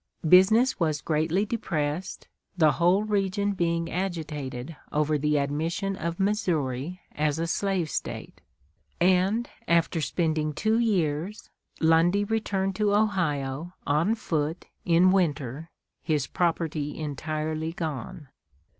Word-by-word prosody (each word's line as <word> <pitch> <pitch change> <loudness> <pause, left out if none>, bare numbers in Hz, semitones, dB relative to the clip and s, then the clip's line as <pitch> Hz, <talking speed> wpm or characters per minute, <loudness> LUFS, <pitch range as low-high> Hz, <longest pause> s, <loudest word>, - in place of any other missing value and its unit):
Business 210 +9 +5
was 155 -3 +1
greatly 160 +7 0
depressed, 175 -6 -3 0.3
the 155 -3 +5
whole 175 +7 +3
region 205 -1 0
being 170 -3 -1
agitated 155 -6 -4 0.2
over 150 +1 +1
the 150 +1 +1
admission 160 +7 -1
of 170 -1 -4
Missouri 175 - -1
as 150 0 0
a 165 - -1
slave 185 0 0
State; - - -5 0.6
and, 190 +6 +3 0.2
after 170 0 +2
spending 155 -2 0
two 220 +7 +1
years, 185 -3 -1 0.3
Lundy 165 +5 +4
returned 200 -3 -1
to 210 -1 +2
Ohio, 170 -6 0
on 160 +10 +2
foot, 160 -5 -2 0.2
in 175 +2 +5
winter, 155 -5 0 0.3
his 150 -4 0
property 160 -4 -1
entirely 155 +1 -3
gone. 155 -1 -5
165 Hz, 110 wpm, -27 LUFS, 150-190 Hz, 0.6 s, Business